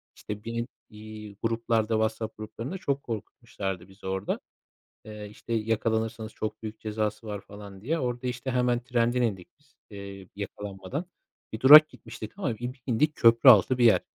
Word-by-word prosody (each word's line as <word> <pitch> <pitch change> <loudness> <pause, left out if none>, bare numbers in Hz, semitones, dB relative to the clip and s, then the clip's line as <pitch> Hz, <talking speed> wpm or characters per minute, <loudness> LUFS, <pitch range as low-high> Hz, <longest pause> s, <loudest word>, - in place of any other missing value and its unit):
İşte, 105 0 -7
binin, 115 +1 -3 0.2
iii, 105 -1 -10
gruplarda, 115 -1 +1
WhatsApp 110 0 -1
gruplarında 115 - -6
çok 140 -7 -2
korkutmuşlardı 95 -4 -5
bizi 95 0 -12
orada. 95 +1 -2 0.7
Eee, 105 -1 -8
işte, 110 +2 -8
yakalanırsanız 110 0 -1
çok 110 - -5
büyük 110 0 -7
cezası 110 0 -3
var 105 -2 -4
falan, 100 -1 -11
diye. 155 +11 -1
Orada, 125 -2 -2
işte, 125 +1 -3
hemen 125 -1 +1
trenden 120 0 +1
indik 100 -7 -2
biz, 145 -1 -31 0.2
ııı, 100 -1 -9
yakalanmadan. 100 - -5 0.5
Bir 110 - -5
durak 150 +4 +10
gitmiştik 110 - -10
ama 125 - -2
bir 125 +1 -6
indik 145 +5 +2
köprü 115 +1 +7
altı 120 +3 +5
bir 120 - +4
yer. 115 - +6
110 Hz, 155 wpm, -27 LUFS, 105-120 Hz, 0.7 s, durak